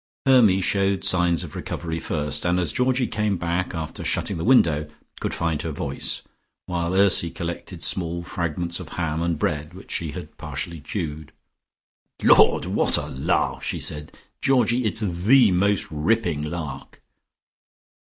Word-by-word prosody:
Hermy 115 -8 +5
showed 95 0 +1
signs 90 -2 +2
of - - -9
recovery 80 -1 -4
first, 75 -2 -2
and 90 +1 +2
as 85 - 0
Georgie 125 0 +1
came 105 -4 -1
back 85 +1 -2
after 80 -2 -5
shutting - - -1
the 80 - -3
window, 80 - +4 0.3
could - - -2
find 80 -2 -1
her 80 - -3
voice, 70 -1 -2 0.4
while 85 0 -2
Ursy 95 -3 +4
collected 85 +1 -6
small 85 -1 +1
fragments 85 0 -3
of - - -8
ham 80 -2 -1
and 85 -1 0
bread 75 +3 -2
which 95 - -12
she 80 - -2
had - - -9
partially 85 -3 -5
chewed. 80 -3 -5 0.9
"Lord! - - +6
What - - +3
a - - -2
lark!" 65 - 0
she - - -3
said. 75 0 -6 0.2
"Georgie, 125 -2 +2
it's 110 +1 0
the 105 +5 +4
most 100 +2 +2
ripping 80 0 0
lark." 75 -1 -6
85 Hz, 150 wpm, -23 LUFS, 80-100 Hz, 0.9 s, Lord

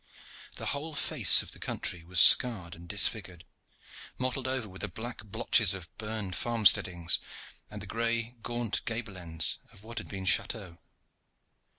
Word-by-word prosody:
The - - -6
whole 150 +2 -6
face - - +5
of - - -13
the - - -9
country 85 - -4
was 90 +2 0
scarred 100 -9 +6
and 85 +1 -13
disfigured, 95 -3 0 0.7
mottled 130 0 -3
over 130 -4 -2
with 95 -1 -10
the 105 - -2
black 110 +5 -8
blotches 110 -1 +2
of 90 -3 -11
burned 105 -4 -4
farm 115 +1 -3
steadings, 85 -3 +4 0.5
and 105 -1 -8
the - - -7
gray, 115 +3 -2
gaunt 120 -2 -3
gable 115 -3 -5
ends 80 -3 +1
of 100 - -17
what 115 +1 -7
had - - -10
been 95 -2 -7
chateaux. 95 -3 -1
105 Hz, 160 wpm, -28 LUFS, 90-115 Hz, 0.7 s, scarred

